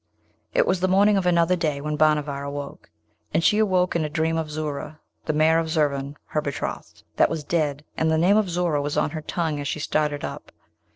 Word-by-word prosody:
It - - +4
was 190 - +1
the 185 - +1
morning 200 +3 +4
of 190 -2 +1
another 170 0 +3
day 155 -5 -1
when 150 +1 -3
Bhanavar 150 -2 +1
awoke; 140 0 -7 0.5
and 165 - +2
she 210 - +4
awoke 185 -4 +2
in 170 - +1
a 150 - -2
dream 160 +1 0
of 160 -1 -2
Zoora, 150 0 -5 0.3
the - - 0
mare 160 +2 +4
of 165 -1 -2
Zurvan 145 -2 0
her 150 - -2
betrothed, 140 -2 -5
that - - +4
was 160 -2 -3
dead, 150 -2 -1
and 160 - +1
the 160 - +2
name 180 +5 +4
of 215 -3 +2
Zoora 170 -4 0
was 145 +1 -3
on 150 0 +1
her 155 - -5
tongue 155 -1 -2
as 145 - -4
she 155 - -3
started 150 -1 -1
up. - - -8
155 Hz, 220 wpm, -24 LUFS, 150-170 Hz, 0.5 s, It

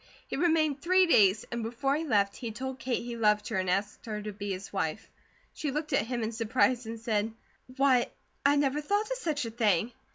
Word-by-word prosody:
He - - -4
remained 310 -3 +2
three 370 +2 +4
days, 205 - +4
and 235 0 -2
before 245 +5 -1
he 315 - -1
left 200 -7 +2
he 235 - -5
told 265 +3 -5
Kate 250 -2 -2
he 240 0 -5
loved 210 -2 +2
her, 220 - -1
and 185 -1 0
asked 200 +5 -2
her 215 -1 -3
to 210 0 -5
be 205 0 -5
his 190 +2 -6
wife. 175 -1 -3 0.4
She 300 - -3
looked 300 +2 -3
at 215 - +2
him 240 -2 -2
in 220 - -2
surprise 235 +1 +1
and 225 0 -5
said: 220 -1 0 0.5
"Why, 265 -3 +4 0.4
I 280 +1 +5
never 285 0 +1
thought 410 +8 0
of - - -1
such 300 - -1
a 230 - -5
thing! 220 -1 +1
235 Hz, 220 wpm, -29 LUFS, 210-280 Hz, 0.5 s, I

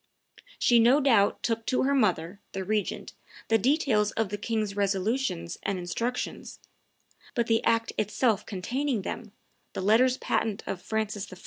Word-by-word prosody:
She 240 -1 +4
no 245 +5 +5
doubt 230 -8 +3
took 230 -1 -1
to 255 - +1
her 275 +1 +2
mother, 190 -7 +1
the 195 - -3
regent, 210 +1 -2 0.4
the 225 0 +4
details 245 -4 +2
of 220 -3 -1
the 205 - -3
king's 215 -2 -2
resolutions 195 -2 -1
and 195 - -2
instructions; 230 +8 -4 0.8
but 235 - +1
the 225 0 +1
act 230 0 +1
itself 215 +1 +1
containing 235 +4 -2
them, 220 +1 -6 0.4
the - - -4
letters 240 +6 +4
patent 220 -5 -1
of 185 - -4
Francis 215 -2 -3
I. 185 - -10
220 Hz, 150 wpm, -27 LUFS, 200-240 Hz, 0.8 s, no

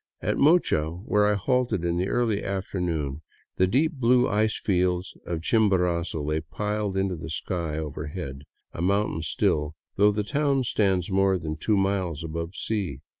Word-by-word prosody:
At - - -1
Mocha, 140 - +4
where 105 +4 +1
I 105 - +3
halted 115 -3 0
in 85 0 0
the 90 +2 0
early 115 -2 0
after 95 -1 -3
noon, 75 -5 -2 0.4
the 95 - +4
deep 140 - +2
blue 125 -2 +3
ice 105 +1 +1
fields 90 -1 0
of 85 -2 -2
Chimborazo 90 -7 +1
lay 75 +2 -1
piled 105 0 -2
into 95 -1 0
the 80 0 -7
sky 80 0 -3
overhead, 75 -2 -5 0.3
a - - -5
mountain 100 -2 +1
still, 75 0 0 0.2
though 105 +1 +5
the 105 0 -1
town 140 +3 +1
stands 95 -5 +1
more 95 0 +3
than 80 -2 -4
two 100 +6 +1
miles 95 -5 0
above 85 +2 -4
the - - -12
sea. 95 - -2
95 Hz, 170 wpm, -26 LUFS, 80-105 Hz, 0.4 s, though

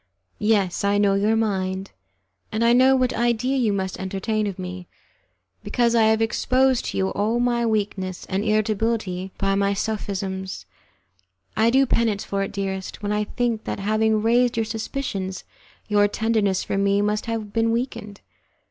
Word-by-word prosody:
Yes, 205 -4 +1
I 200 0 +2
know 205 -1 +3
your 205 +3 +2
mind, 190 -3 -1 0.6
and 220 +2 0
I 235 - +5
know 260 +2 +5
what 255 -1 +1
idea 240 +3 +1
you 240 -5 +2
must 190 -2 -3
entertain 205 +3 -2
of 195 - -5
mine, 180 -1 -7 0.8
because 235 -2 +1
I 230 -2 +4
have 220 0 +3
exposed 255 +3 +2
to - - -3
you 190 0 +1
all 220 +4 0
my 240 -1 +1
weakness 200 -4 -2
and 195 +2 -2
irritability 215 -3 0
by 195 0 +1
my 200 0 +1
sophisms. 190 - -3 0.9
I 225 +1 +4
do 265 +3 +4
penance 225 -5 +1
for 200 0 -2
it, 195 - -2
dearest, 195 0 -4
when 205 - -1
I 210 0 0
think 235 -1 -2
that - - -3
having 215 +1 +1
raised 240 +1 +3
your 225 - +1
suspicions 215 -4 -4 0.4
your 205 -1 +4
tenderness 210 -3 0
for 195 - -2
me 200 +1 +2
must 210 +2 -1
have 220 -3 -4
been 230 0 +2
weakened. 230 -4 -4
210 Hz, 165 wpm, -23 LUFS, 195-230 Hz, 0.9 s, I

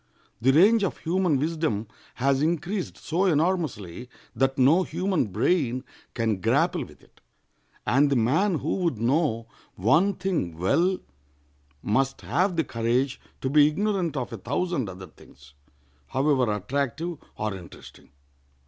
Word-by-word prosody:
The 130 +3 +4
range 205 +9 +5
of 195 - -1
human 175 -2 +1
wisdom 155 -8 -1 0.3
has 135 +2 +1
increased 175 +4 -1
so 180 +4 -1
enormously 150 - -1 0.3
that 135 0 +1
no 140 +8 +5
human 185 - -1
brain 125 - 0 0.3
can 110 -5 0
grapple - - +2
with - - -15
it, - - -25 0.6
and 135 +6 +3
the 140 - +2
man 155 - +2
who - - -2
would 170 - 0
know 120 0 +1 0.3
one 160 - +3
thing 170 - -2
well 170 - +2 0.9
must 135 +6 0
have 185 +1 0
the 165 - +2
courage 120 +3 -1 0.2
to 130 - -1
be 150 0 +6
ignorant 185 -1 -1
of 125 -2 -4
a - - -4
thousand 135 - -2
other 95 0 -9
things, 75 -3 -18 0.5
however 130 -3 +1
attractive 140 - -2 0.2
or 110 -1 -2
interesting. 90 -3 -12
140 Hz, 135 wpm, -26 LUFS, 115-175 Hz, 0.9 s, be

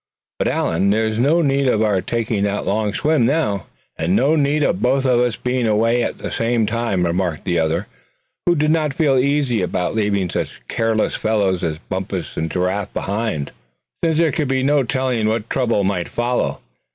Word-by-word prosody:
But - - +1
Allan, 95 +4 +1
there's 110 +1 +1
no 155 +7 +3
need 140 -1 +2
of 110 -3 +2
our 100 -3 +1
taking 115 -2 -1
that 100 0 -2
long 105 +1 0
swim, 150 +4 +1
now." 130 -9 0 0.3
"And 90 - +1
no 140 +8 +3
need 150 0 +2
of 170 - 0
both 135 +2 +2
of 125 -2 +3
us 120 -2 +1
being 125 -1 -1
away 115 +3 +2
at - - -2
the - - -6
same 115 -1 +1
time," 110 -5 0
remarked 85 -2 -1
the 85 -2 +1
other, 80 0 0 0.6
who 175 - +4
did 150 0 +2
not 155 -4 +1
feel 140 -4 +3
easy 135 -4 +1
about 90 0 -1
leaving 100 -3 0
such - - -4
careless 115 -1 0
fellows 100 -4 0
as 80 -3 -2
Bumpus 95 -3 -4
and 80 +1 -2
Giraffe 95 +3 -1
behind, 100 -8 -2 0.5
since 165 -2 +2
there 165 -2 +3
could 150 -1 -1
be 130 0 0
no 145 +1 +3
telling 125 -3 0
what 110 0 -1
trouble 120 -6 +1
might 95 -3 -1
not - - -18
follow. 120 +1 -1
115 Hz, 190 wpm, -20 LUFS, 100-135 Hz, 0.6 s, who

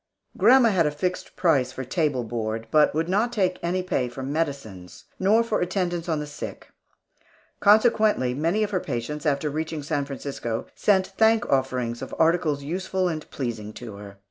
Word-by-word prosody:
Grandma 255 -2 +6
had 175 -7 +2
a - - +2
fixed 180 +5 -4
price 140 -8 +2
for 130 - -6
table 140 -2 0
board, 110 -1 -3
but 150 -1 +5
would 160 +1 0
not 210 +6 +1
take 190 -6 0
pay 175 -7 -1
for 130 +2 -7
medicines, 135 - -4 0.2
nor 215 +5 +4
for 230 - -1
attendance 175 -2 -1
on 160 -2 0
the 150 - -4
sick; 145 -1 -8 0.9
consequently, 215 - +4
many 165 +10 +1
of 210 - -2
her 185 - +1
patients, 150 +2 -4
after 145 +1 +1
reaching 155 +1 -3
San 145 -1 -1
Francisco, 135 -4 -4
sent 190 -2 +1
thank 225 +1 +4
offerings 125 -3 0
of 130 - -6
articles 160 -3 +2
useful 185 +4 -1
and 155 -3 -4
pleasing 115 -5 -4
to 115 -2 -8
her. 100 -1 -11
155 Hz, 170 wpm, -25 LUFS, 130-185 Hz, 0.9 s, Grandma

